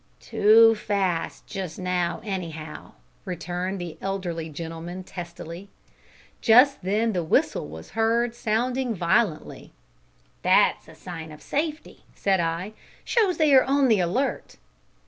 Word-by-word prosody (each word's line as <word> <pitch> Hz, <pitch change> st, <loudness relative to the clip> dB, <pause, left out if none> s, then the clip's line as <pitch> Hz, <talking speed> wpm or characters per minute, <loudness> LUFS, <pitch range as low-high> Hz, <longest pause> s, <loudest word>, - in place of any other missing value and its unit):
"Too 225 Hz, +2 st, +5 dB
fast 190 Hz, -6 st, -2 dB
just 185 Hz, -5 st, -6 dB
now, 180 Hz, -1 st, -1 dB
anyhow," 165 Hz, -6 st, -6 dB, 0.3 s
returned 180 Hz, +1 st, -4 dB
the 175 Hz, -3 st, -7 dB
elderly 175 Hz, -4 st, -3 dB
gentleman 165 Hz, +3 st, -7 dB
testily. 175 Hz, +1 st, -8 dB, 0.7 s
Just 250 Hz, +4 st, +6 dB
then 215 Hz, +4 st, 0 dB
the 175 Hz, -2 st, -1 dB
whistle 155 Hz, -, +1 dB
was 80 Hz, +2 st, -11 dB
heard 230 Hz, +1 st, +1 dB
sounding 240 Hz, +2 st, -1 dB
violently. 170 Hz, -1 st, -1 dB, 0.7 s
"That -, -, +4 dB
is -, -, -27 dB
a -, -, -14 dB
sign 165 Hz, -3 st, -8 dB
of 150 Hz, -, -11 dB
safety," 305 Hz, +1 st, -3 dB
said 195 Hz, -2 st, +1 dB
I; 170 Hz, +5 st, -2 dB, 0.3 s
"shows 420 Hz, -7 st, +2 dB
that 315 Hz, -, +2 dB
they 295 Hz, -2 st, +4 dB
are 260 Hz, -, +7 dB
on 275 Hz, -1 st, +2 dB
the 215 Hz, -3 st, +4 dB
alert." 185 Hz, +11 st, -1 dB
190 Hz, 130 wpm, -25 LUFS, 170-230 Hz, 0.7 s, are